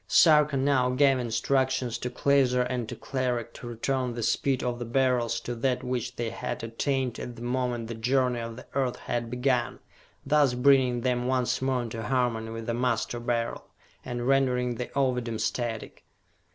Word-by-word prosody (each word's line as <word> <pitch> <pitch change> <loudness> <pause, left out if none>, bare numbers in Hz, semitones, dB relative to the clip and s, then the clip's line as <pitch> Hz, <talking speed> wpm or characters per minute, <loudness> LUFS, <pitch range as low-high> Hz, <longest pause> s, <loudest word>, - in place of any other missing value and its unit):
Sarka 150 -3 +5
now 130 -2 +2
gave 135 +1 +3
instructions 125 +1 0
to 125 - -3
Klaser 130 -2 +3
and 125 -2 -3
to - - -5
Cleric 125 -3 -2
to 120 - -9
return 125 +1 -2
the 120 - -3
speed 130 +3 +1
of 120 -1 -2
the 120 - -4
Beryls 120 -1 +1
to 120 - -4
that 125 +1 -1
which 125 -2 -3
they 115 -1 -3
had - - -5
attained 125 +2 -1
at 120 - -6
the 115 - -9
moment 120 -2 -1
the 115 - -5
journey 125 +2 +1
of 115 0 -5
the 130 - -11
Earth 130 -3 0
had 120 -1 -3
begun 125 0 0 0.5
thus 145 -4 +3
bringing 125 -2 +4
them 125 0 0
once 130 -1 0
more 130 -2 0
into 115 -1 -5
harmony 115 -1 0
with 115 0 -6
the 115 - -1
Master 120 0 -1
Beryl, 120 -1 -2 0.4
and 120 -1 -4
rendering 125 -2 +2
the 120 +1 -4
Ovidum 125 -4 0
static. 115 -1 -3
125 Hz, 175 wpm, -27 LUFS, 120-130 Hz, 0.5 s, Sarka